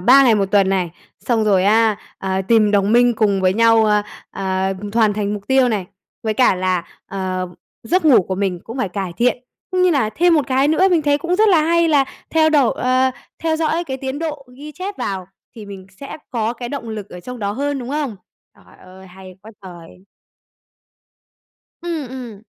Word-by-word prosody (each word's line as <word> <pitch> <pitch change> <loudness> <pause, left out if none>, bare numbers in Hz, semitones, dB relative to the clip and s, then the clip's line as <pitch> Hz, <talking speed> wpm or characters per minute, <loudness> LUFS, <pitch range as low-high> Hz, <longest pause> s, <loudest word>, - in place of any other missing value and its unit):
3 260 +9 +6
ngày 230 -3 +5
1 200 -2 +1
tuần 195 -2 +3
này, 185 -3 0 0.3
xong 225 -3 0
rồi 195 -3 +3
á, 220 0 +3 0.2
ờ, 190 0 -2
tìm 220 -3 +4
đồng 205 +1 +2
minh 245 0 +4
cùng 205 -3 +1
với 185 0 +2
nhau, 225 0 +4
ờ, 210 -1 +2 0.3
ờ, 190 0 -2 0.2
hoàn 220 -2 +3
thành 205 0 -2
mục 200 -1 -8
tiêu 265 -1 +4
này, 200 -5 -2 0.4
với 220 -1 -1
cả 250 -5 +4
là, 185 -2 -1 0.2
ờ, 185 -2 -3 0.3
giấc 355 +9 0
ngủ 265 -10 +6
của 190 - -4
mình 185 -3 -2
cũng 235 +4 -8
phải 200 - -1
cải 185 -1 -4
thiện, 245 +1 +1 0.3
cũng 365 0 +1
như 365 - +4
là 265 -9 +1
thêm 345 +7 +3
một 295 -6 +1
cái 270 +2 +2
nữa 345 +5 +3
mình 340 -3 +2
thấy 290 0 +2
cũng 345 +4 -1
rất 435 0 +4
là 335 -5 +4
hay, 335 +1 +2
là 285 -3 +4 0.3
theo 315 -1 +3
đổi 285 -6 +3
ờ, 255 +1 +2 0.3
theo 320 -1 -1
dõi 325 +2 -1
cái 265 -3 -4
tiến 265 +2 -5
độ 300 -4 -5
ghi 300 +2 -10
chép 385 +6 -6
vào 190 -2 -4 0.3
thì 210 -2 -9
mình 190 -2 -10
sẽ 275 - -7
có 230 -2 -1
cái 240 0 -7
động 270 -4 -6
lực 210 -2 -6
ở 180 - -9
trong 250 +5 -8
đó 200 -2 -2
hơn, 285 +4 -2
đúng 245 - -7
không? 285 -7 -3 0.4
Trời - - -21
ơi, 190 +1 -14
hay 185 0 -13
quá 220 - -12
trời! 180 0 -13 1.8
Ừm, 325 -7 -4
ừm. 235 -6 -9
230 Hz, 210 wpm, -19 LUFS, 195-285 Hz, 1.8 s, 3